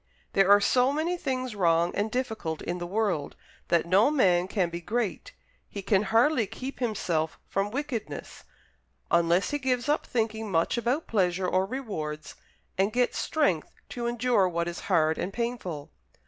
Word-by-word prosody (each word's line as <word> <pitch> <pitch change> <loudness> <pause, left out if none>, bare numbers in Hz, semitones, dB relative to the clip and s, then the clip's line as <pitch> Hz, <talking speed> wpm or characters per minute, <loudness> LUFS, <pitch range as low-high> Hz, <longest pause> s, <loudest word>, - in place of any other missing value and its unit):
There 195 0 +4
are 205 0 +8
so 250 +5 +3
many 320 +5 0
things 255 -7 -3
wrong 170 -2 +2
and 205 +2 -1
difficult 220 -10 -3
in 175 +1 -3
the 175 - -4
world, 195 -7 -1 0.3
that 170 -1 +2
no 195 +9 +4
man 185 -12 +3
can 185 -4 0
be 170 +1 -5
great 220 +2 -3 0.4
he 200 - -6
can 195 -1 +3
hardly 230 +1 +3
keep 255 +6 -7
himself 175 -9 -1
from 195 +1 -1
wickedness 265 -2 -5 0.7
unless 170 +2 +3
he 290 - -1
gives 255 -1 0
up 295 +1 +1
thinking 220 -2 -1
much 165 -3 +1
about 245 +6 0
pleasure 185 -3 +1
or 185 +1 +1
rewards, 165 - -5 0.5
and 195 +2 +3
gets 245 +2 +1
strength 195 - 0
to 240 -1 -3
endure 240 -5 +2
what 170 0 -1
is 175 0 -4
hard 160 -3 +3
and 190 +2 -3
painful. 230 -11 -4
205 Hz, 160 wpm, -27 LUFS, 175-245 Hz, 0.7 s, are